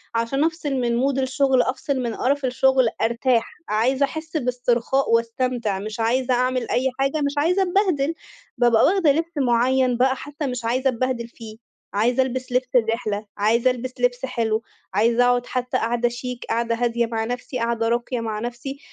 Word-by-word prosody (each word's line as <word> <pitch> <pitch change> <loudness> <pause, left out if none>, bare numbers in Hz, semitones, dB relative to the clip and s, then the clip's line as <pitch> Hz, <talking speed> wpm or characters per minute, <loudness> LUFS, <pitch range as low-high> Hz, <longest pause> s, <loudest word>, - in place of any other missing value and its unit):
عشان 230 +6 0
أفصِل 320 -3 -1
من 240 -2 0
Mood 270 0 +1
الشُغل 265 0 +2
أفصِل 265 +1 -2
من 235 -2 -3
قرّف 280 +1 0
الشُغل 260 -1 +3
أرتاح. 235 +1 +1 0.2
عايزة 255 +6 +2
أحس 315 +3 -5
باسترخاء 250 0 0
واستمتع، 230 -3 0
مش 215 +3 -6
عايزة 250 +3 +1
أعمل 250 0 0
أي 260 +2 +1
حاجة، 275 +3 0
مش 280 - -1
عايزة 350 +6 +2
أتبهدِل. 355 -6 +1 0.4
بابقى 235 -2 +4
واخدة 360 -5 +4
لبسّ 330 +2 -2
مُعيّن 255 0 +2
بقى 260 +2 +3
حتى 290 +2 -5
مش 250 -2 -4
عايزة 255 +3 +1
اتبهدِل 250 -1 -2
فيه، 225 -2 -11 0.4
عايزة 240 +5 +2
ألبِسّ 255 0 -4
لبسّ 250 0 0
الرحلة، 225 -3 0
عايزة 230 +5 +3
ألبِسّ 255 +1 -5
لبسّ 245 +1 +1
حلو، 225 -3 -1 0.3
عايزة 230 +4 +3
أقعد 245 0 +2
حتى 250 -1 -2
قعدة 240 +1 0
شيك، 250 0 -6
قعدة 230 0 0
هادية 235 0 0
مع 225 -1 -2
نفسي، 250 +1 -4
قعدة 230 -1 0
راقية 240 +1 -1
مع 220 -2 -3
نفسي، 245 +4 -6
250 Hz, 170 wpm, -22 LUFS, 235-265 Hz, 0.4 s, بابقى